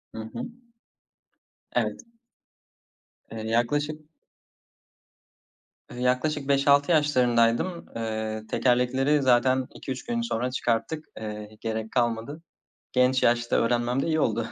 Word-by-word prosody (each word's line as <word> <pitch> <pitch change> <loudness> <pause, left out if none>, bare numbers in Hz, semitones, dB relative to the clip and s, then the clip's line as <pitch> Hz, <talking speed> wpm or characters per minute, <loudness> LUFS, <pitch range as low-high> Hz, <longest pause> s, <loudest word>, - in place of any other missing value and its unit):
Hı - - -6
hı. - - -4 1.3
Evet. - - 0 1.3
Eee, 110 0 -5
yaklaşık 145 +7 -1 1.8
Eee, 120 - -8
yaklaşık 135 +3 0
5-6 140 +2 +4
yaşlarındaydım. 130 +1 +2
Eee, 110 -1 -3
tekerlekleri 130 +5 +2
zaten 130 0 +3
2-3 130 -2 -6
gün 235 -1 -1
sonra 125 - -2
çıkarttık. 125 +5 -1
Eee, 105 0 -7
gerek 110 -1 -3
kalmadı. 120 +5 -1 0.5
Genç 125 0 +3
yaşta 120 0 +2
öğrenmem 120 +2 +1
de - - -2
iyi 160 -1 +1
oldu. 115 -4 0
125 Hz, 105 wpm, -26 LUFS, 115-145 Hz, 1.8 s, 5-6